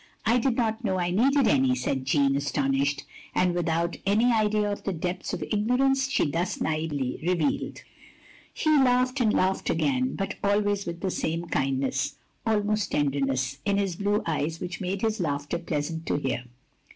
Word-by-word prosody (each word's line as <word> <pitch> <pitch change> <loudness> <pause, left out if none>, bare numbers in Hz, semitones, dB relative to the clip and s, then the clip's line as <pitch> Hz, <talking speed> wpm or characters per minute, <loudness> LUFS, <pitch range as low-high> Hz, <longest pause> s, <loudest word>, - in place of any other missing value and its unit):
"I 235 +2 +4
did 245 0 +1
not 225 -1 -1
know 190 -4 0
I 175 -1 0
needed 265 +6 +3
any," 130 -2 +3
said 130 +1 -2
Jeanne, 135 0 +3
astonished, 140 0 0 0.3
and 180 -1 +3
without 170 0 0
any 220 +5 +3
idea 210 -1 +2
of 205 - -4
the 195 - -1
depths 180 +2 -3
of - - -3
ignorance 265 +5 +1
she 280 - +2
thus 170 +5 -2
naively 155 -5 -2
revealed. 170 -3 -1 0.7
He 310 - 0
laughed, 255 +1 +3
and 220 -3 +3
laughed 190 -1 +1
again; 135 -6 +1
but 195 - -3
always 205 -1 +1
with 170 0 -5
the 190 - -1
same 165 +1 -2
kindness 135 0 0 0.2
— - - -14
^almost 210 -2 +1
tenderness 135 -2 0
— - - -36
^in 200 0 +2
his 195 -3 0
blue 205 +3 0
eyes 160 0 -1
which 180 +2 -5
made 190 +2 -3
his 220 0 0
laughter 145 0 -2
pleasant 160 0 -3
to - - +1
hear. 130 -3 -2
175 Hz, 175 wpm, -26 LUFS, 145-210 Hz, 0.7 s, I